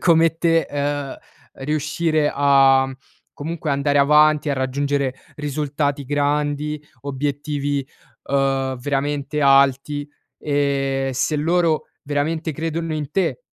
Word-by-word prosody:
come 165 -1 +4
te, 165 -1 +2
uhm, 145 -1 -2 0.5
riuscire 150 +1 0
a, 135 -1 +4 0.4
comunque 160 +1 -4
andare 140 +1 +1
avanti, 150 +1 +4
a 140 - +1
raggiungere 135 0 -1 0.2
risultati 145 -1 -2
grandi, 145 +1 -1 0.2
obiettivi, 145 0 -2 0.4
uhm, 135 -1 0
veramente 145 +2 -2
alti, 140 +1 +3 0.3
e 140 -2 0
se 150 +4 0
loro 165 +1 +1 0.2
veramente 155 +3 -2
credono 165 +2 -3
in 150 -3 -4
te, 195 - 0
145 Hz, 100 wpm, -21 LUFS, 140-150 Hz, 0.5 s, come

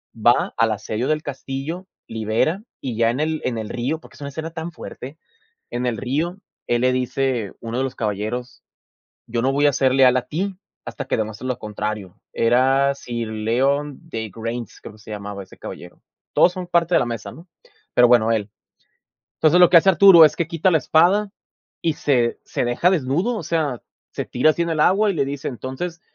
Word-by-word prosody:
Va 115 +2 +2
al 115 -1 +3
asedio 110 +3 -3
del 155 0 0
castillo, 145 +6 -5 0.2
libera, 115 - -1 0.2
y 125 -4 -4
ya 115 0 +3
en 125 - -4
el 155 +1 -1
en 120 -2 -1
el 110 -1 -5
río, 135 +7 -2
porque - - -17
es - - -16
una 140 - -5
escena 160 +3 -6
tan 165 +1 -6
fuerte, 145 -3 -9 0.5
en 120 +1 -2
el 120 -2 -1
río, 155 - -2 0.3
él 120 0 +1
le 130 0 +3
dice, 125 -3 -1
uno 115 +1 -4
de - - +1
los 130 - -5
caballeros: 110 +4 -4 0.6
"Yo 115 0 -2
no 135 +2 +2
voy 145 +2 +3
a 145 - +4
ser 130 -1 +2
leal 130 -2 +5
a 125 - +1
ti, 185 +9 -3 0.3
hasta - - -6
que - - 0
demuestres 110 +2 -4
lo 125 -2 -2
contrario". 105 -3 -5
Era 135 +4 +3
Sir 120 -4 -5
Leodegrance, 115 - -2
creo - - -10
que - - -18
se 105 - -14
llamaba 100 -1 -6
ese 95 - -18
caballero. - - -10 0.3
Todos 180 - +5
son 180 0 -6
parte 175 0 +1
de - - +6
la 125 - 0
mesa, 115 -2 -5
¿no? 165 +7 -14 0.5
Pero 120 - +6
bueno, 115 -2 +4
él. 105 -2 -1 0.9
Entonces, 160 +3 +4
lo 180 - +8
que - - +7
hace 180 +4 +7
Arturo 180 -1 +8
es 155 - +4
que 170 -2 -1
quita 170 +2 +1
la 160 - +5
espada 180 +8 +3 0.5
y 165 - +2
se 125 -6 +1
se - - -2
deja 120 +9 +2
desnudo, 175 - 0
o - - -4
sea, 150 -7 -1 0.3
se - - -3
tira 125 +5 +3
así, 170 +2 0
en 170 - -2
el 160 -2 0
agua 200 +6 +4
y - - -2
le 145 -4 +1
dice: 140 0 -5
"Entonces, 135 +7 -6
130 Hz, 200 wpm, -21 LUFS, 115-160 Hz, 0.9 s, lo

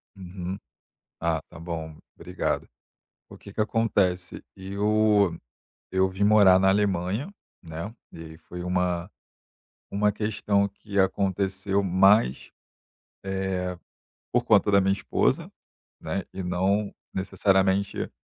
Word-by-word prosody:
Uhum. 90 0 -6 0.6
Ah, 80 -1 0
tá - - -12
bom, 80 -2 -6 0.2
obrigado. 90 +2 -3 0.6
O - - -12
que 100 - -12
que 110 - -1
acontece, 100 -5 0
eu 100 -1 +2 0.5
eu 95 0 +2
vim 95 +2 -5
morar 100 -3 +6
na 95 - +4
Alemanha, 100 - 0 0.3
né, 85 +5 -6 0.2
e - - -11
aí 80 -1 -10
foi 90 +2 -9
uma 90 0 -1 0.8
uma 105 +1 +2
questão 105 -1 0
que 100 +1 -6
aconteceu 95 +1 0
mais, 95 - +3 0.7
eh, 95 -1 -2 0.6
por 125 0 +1
conta 105 -3 +4
da 100 0 +5
minha 95 +1 +2
esposa, 100 - 0 0.5
né, 95 - -3
e 95 - -5
não 95 +3 0 0.2
necessariamente 95 0 +1
95 Hz, 115 wpm, -26 LUFS, 90-100 Hz, 0.8 s, morar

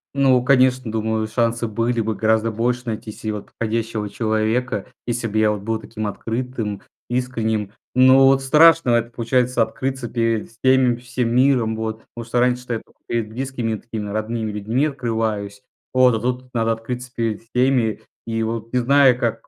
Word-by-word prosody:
Ну, 130 -3 +4
конечно, 130 -2 +3
думаю, 110 0 -1
шансы 115 +1 0
были 115 +2 -1
бы 110 0 -1
гораздо 110 +1 +1
больше 120 +3 -1
найти 110 -1 -4
се 110 +1 -5
вот 105 -1 -6
подходящего 115 -1 -3
человека, 110 +1 -1 0.2
если 120 -1 -1
бы 110 0 -1
я 110 0 +4
вот 105 -1 -4
был 110 +2 -2
таким 110 -1 -6
открытым, 115 -1 -4 0.3
искренним. 115 -5 -1 0.2
Но 130 +1 +7
вот 135 0 +4
страшно 160 +1 +5
это, 120 0 +2
получается, 120 +1 +1
открыться 130 +2 -4
перед 115 -1 -1
всеми, 125 +1 +3
всем 125 -1 -2
миром, 125 -4 +3
вот. 110 0 -4
Потому 120 -1 -7
что 120 +1 0
раньше-то 125 0 +1
я 115 - -1
тока - - -25
перед 115 -2 -2
близкими 125 -1 -3
и 110 - -4
такими 110 -3 -6
родными 110 +1 -2
людьми 110 +7 0
открываюсь. 110 -7 -3 0.3
Вот, 130 -1 +5
а - - -1
тут 125 +2 -2
надо 115 -1 +1
открыться 125 +2 -6
перед 115 -3 -2
всеми. 125 -1 +1 0.3
И 115 0 -1
вот, 115 0 -4
не 125 - +1
зная, 135 +1 +5
как 115 -2 -3
115 Hz, 175 wpm, -21 LUFS, 110-125 Hz, 0.3 s, Но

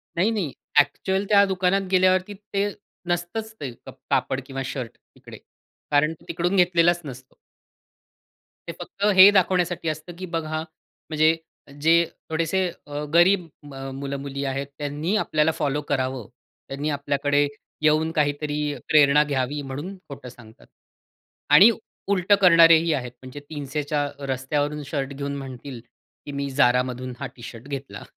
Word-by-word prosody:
नाही, 185 +6 +2
नाही. 195 -10 -2 0.3
ॲक्चुअल 190 +6 +1
त्या 200 -1 +6
दुकानात 190 0 +1
गेल्यावरती 185 +1 +3 0.2
ते 200 +1 +1 0.4
नसतंच 175 +6 -3
ते 135 -3 -5
क 120 - -14 0.2
कापड 130 - 0
किंवा 135 0 -5
शर्ट 130 -3 -5 0.2
तिकडे. - - -12 0.5
कारण 150 +2 +3
तो 160 - -19
तिकडून 175 +3 -1
घेतलेलाच 175 -1 +3
नसतो. 130 -1 -10 1.3
ते - - -3
फक्त 200 +1 -4
हे 190 +2 +11
दाखवण्यासाठी 180 -3 +1
असतं, 155 +3 -6
की 185 - -5
बघा 160 -3 -3 0.5
म्हणजे 155 0 +3 0.5
जे 160 +2 +5 0.4
थोडेसे 165 +3 0 0.3
अ, 145 0 -4
गरीब 180 +2 +5 0.2
अ, - - -13
म 135 -1 -7
मुलं-मुली 140 0 -4
आहेत, 135 +1 -3
त्यांनी 150 +6 -2
आपल्याला 155 +1 +1
फॉलो 145 0 0
करावं. 130 -4 -2 0.4
त्यांनी 140 +3 -3
आपल्याकडे 145 0 +1 0.3
येऊन 155 +1 +3
काहीतरी 150 -1 -1 0.3
प्रेरणा 150 -1 +5
घ्यावी 145 0 -2
म्हणून 145 +8 -6
खोटं 140 -2 -9
सांगतात. 115 -2 -17 0.9
आणि 205 +5 +9 0.4
उलटं 200 0 +3
करणारेही 165 -2 +6
आहेत 125 -4 -3
म्हणजे 130 +2 -9
300 145 -1 -4
च्या 145 0 -1 0.3
रस्त्यावरून 145 +3 -2
शर्ट 140 -1 -3
घेऊन 140 0 -4
म्हणतील, 130 -1 -8 0.5
की 145 - -6
मी 140 0 -3
Zaraमधून 125 -1 +2
हा - - -4
टी-शर्ट 120 0 -10
घेतला 140 -1 -7
150 Hz, 140 wpm, -24 LUFS, 140-175 Hz, 1.3 s, हे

